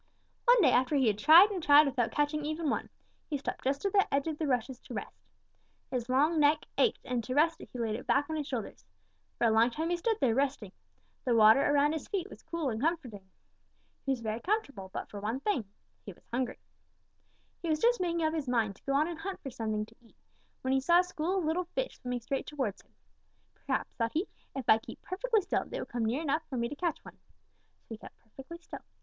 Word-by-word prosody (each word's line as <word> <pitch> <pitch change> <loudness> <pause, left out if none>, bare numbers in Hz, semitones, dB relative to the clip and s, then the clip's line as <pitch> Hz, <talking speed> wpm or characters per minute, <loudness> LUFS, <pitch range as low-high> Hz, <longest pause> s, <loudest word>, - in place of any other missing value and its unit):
"One 485 -2 +6
day 265 - +6
after 255 +4 +2
he 270 -2 +3
had 210 -2 +1
tried 335 - +8
and 375 -3 -3
tried 295 0 +7
without 250 -4 0
catching 295 +1 0
even 310 0 -1
one, - - -2 0.4
he 295 - -1
stopped 275 - -5
just 275 +6 -1
at 395 - 0
the 395 -1 +3
edge 275 0 +1
of 315 -2 -4
the 315 - -1
rushes 250 -1 -1
to - - -10
rest. - - -7 0.7
His 250 -2 -3
long 300 +6 +3
neck 295 +1 +3
ached, 465 - +1
and 245 -2 -2
to 255 +3 -4
rest 325 +3 +3
it - - -11
he - - -8
laid 225 -2 -1
it 230 - -6
back 285 +1 +2
on 315 - -3
his 300 -2 -3
shoulders. 235 - -5 0.5
For - - +1
a 225 - +4
long 225 +2 +4
time 320 +7 -3
he 350 - +1
stood 445 +5 0
there, 255 -5 +2
resting. 265 -6 -1 0.5
The 245 - +2
water 220 +4 +7
around 290 +1 +3
his 320 - -5
feet 395 -1 -3
was - - -12
cool 320 -5 -3
and 220 +1 -4
comforting. 250 - -2 0.7
He 270 - -1
was 255 -3 -1
very 220 0 -3
comfortable 275 - -2
but - - -5
for 205 - -8
one 220 +5 -2
thing, 335 - -1 0.4
he 200 - -8
was - - -26
hungry. 250 0 -1 1.0
He 340 - -3
was 310 - +2
just 475 +4 +2
making 340 -2 0
up 315 0 +1
his 300 -5 -3
mind 220 -5 0
to - - -26
go 275 - +1
on 295 +3 +3
and 340 -2 -6
hunt 385 +3 -5
for 270 - -5
something 215 -3 -2
to 225 - -21
eat 230 - -23 0.5
when 260 0 0
he 270 - +3
saw 345 +5 +5
a - - -4
school 360 +1 -2
of 365 - -1
little 340 +3 0
fish - - -3
swimming 250 -1 -4
straight 270 +3 -3
towards 265 -10 -3
him. - - -34 0.6
'Perhaps,' - - -3
thought 230 0 0
he, 340 +6 0 0.3
'if 265 -4 -5
I 220 - +6
keep - - -11
perfectly 435 +4 0
still, 380 - -1
they - - -6
will - - -4
come 235 -2 -2
near 250 +8 -1
enough 305 +1 0
for 260 - -4
me 235 0 0
to 290 - -6
catch 340 +1 -1
one.' - - -13 0.6
So - - -42
he 225 - -6
kept - - -13
perfectly 270 +8 -11
still. 340 - -10
280 Hz, 240 wpm, -30 LUFS, 235-330 Hz, 1.0 s, tried